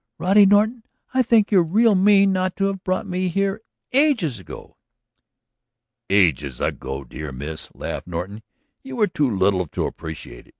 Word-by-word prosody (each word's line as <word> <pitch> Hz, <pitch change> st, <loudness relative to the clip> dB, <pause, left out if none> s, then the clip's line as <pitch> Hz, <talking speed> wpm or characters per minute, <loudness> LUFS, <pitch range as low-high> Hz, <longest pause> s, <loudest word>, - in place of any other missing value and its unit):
"Roddy 195 Hz, +2 st, +5 dB
Norton, 215 Hz, +4 st, +3 dB, 0.3 s
I 260 Hz, -, +3 dB
think 225 Hz, -4 st, +2 dB
you're 190 Hz, -4 st, +5 dB
real 215 Hz, +7 st, +3 dB
mean 195 Hz, 0 st, +4 dB
not 185 Hz, 0 st, -1 dB
to 195 Hz, -, -2 dB
have 195 Hz, -1 st, -3 dB
brought 185 Hz, +3 st, -1 dB
me 185 Hz, -1 st, -2 dB
here 195 Hz, +4 st, -1 dB, 0.3 s
ages 245 Hz, -, +2 dB
ago!" 95 Hz, -, -12 dB, 1.3 s
"Ages 75 Hz, -10 st, +1 dB
ago, 65 Hz, +1 st, -4 dB
my 70 Hz, -, -14 dB
dear 75 Hz, +3 st, -7 dB
miss," 75 Hz, +4 st, -7 dB
laughed -, -, -6 dB
Norton, 90 Hz, +5 st, -6 dB, 0.4 s
"you 270 Hz, -1 st, -9 dB
were 225 Hz, -3 st, +3 dB
too 150 Hz, -8 st, -1 dB
little 95 Hz, -3 st, +1 dB
to -, -, -3 dB
appreciate 80 Hz, -6 st, -8 dB
it. -, -, -23 dB
185 Hz, 165 wpm, -21 LUFS, -, 1.3 s, Roddy